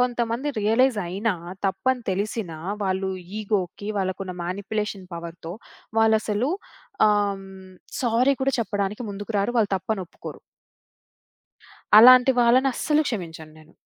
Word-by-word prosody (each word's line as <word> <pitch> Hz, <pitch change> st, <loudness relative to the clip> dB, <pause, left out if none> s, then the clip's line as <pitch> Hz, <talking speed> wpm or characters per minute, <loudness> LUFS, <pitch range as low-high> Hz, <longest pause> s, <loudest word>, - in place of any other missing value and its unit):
కొంతమంది 240 Hz, +2 st, 0 dB
రియలైజయినా, 215 Hz, -3 st, +1 dB, 0.3 s
తప్పని 245 Hz, +6 st, 0 dB
తెలిసినా, 195 Hz, -3 st, -3 dB, 0.3 s
వాళ్ళు 190 Hz, 0 st, -1 dB, 0.3 s
ఇగోకి, 200 Hz, -1 st, -2 dB
వాళ్ళకున్న 185 Hz, 0 st, -3 dB
మానిప్యులేషన్ 200 Hz, +1 st, -4 dB
పవర్‌తో 170 Hz, 0 st, -8 dB, 0.5 s
వాళ్ళసలు 220 Hz, +3 st, +2 dB, 0.6 s
ఆహ్, 205 Hz, -1 st, +1 dB
హ్మ్, 190 Hz, -1 st, -13 dB, 0.3 s
సారీ 250 Hz, +3 st, +3 dB
కూడా 270 Hz, 0 st, +1 dB
చెప్పడానికి 205 Hz, +1 st, -2 dB
ముందుకు 205 Hz, +2 st, -6 dB
రారు. 200 Hz, +5 st, 0 dB
వాళ్ళు 210 Hz, -2 st, +2 dB
తప్పని 205 Hz, +2 st, -3 dB
ఒప్పుకోరు. -, -, -10 dB, 1.6 s
అలాంటి 255 Hz, +2 st, +8 dB
వాళ్ళని 255 Hz, +3 st, +4 dB
అస్సలు 300 Hz, +5 st, +1 dB
క్షమించను 165 Hz, -8 st, -6 dB
నేను. 155 Hz, +1 st, -19 dB
205 Hz, 110 wpm, -24 LUFS, 190-235 Hz, 1.6 s, అలాంటి